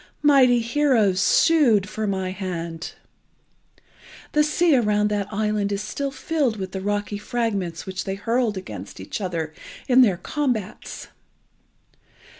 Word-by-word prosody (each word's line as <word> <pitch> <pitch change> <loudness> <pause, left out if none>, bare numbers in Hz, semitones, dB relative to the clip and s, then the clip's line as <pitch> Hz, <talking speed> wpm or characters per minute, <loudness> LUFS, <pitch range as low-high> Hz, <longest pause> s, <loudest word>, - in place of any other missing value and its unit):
Mighty 260 -5 +5
heroes 230 -6 +2
sued 235 - +4
for 215 0 -3
my 190 -2 -2
hand. 170 -4 -5 1.4
The 300 - +3
sea 310 +1 +3
around 210 -3 +2
that 205 -1 -2
island 210 -1 0
is 200 +1 -2
still 280 +6 -3
filled 275 -4 -1
with 190 -2 -5
the 190 - -5
rocky 205 +1 -2
fragments 205 -7 -2
which 190 0 -5
they 195 -1 -2
hurled 230 +1 0
against 105 - -8
each 95 - -5
other 165 -4 -3 0.3
in 255 0 +6
their 200 -8 +4
combats. 245 - -3
210 Hz, 130 wpm, -23 LUFS, 190-245 Hz, 1.4 s, in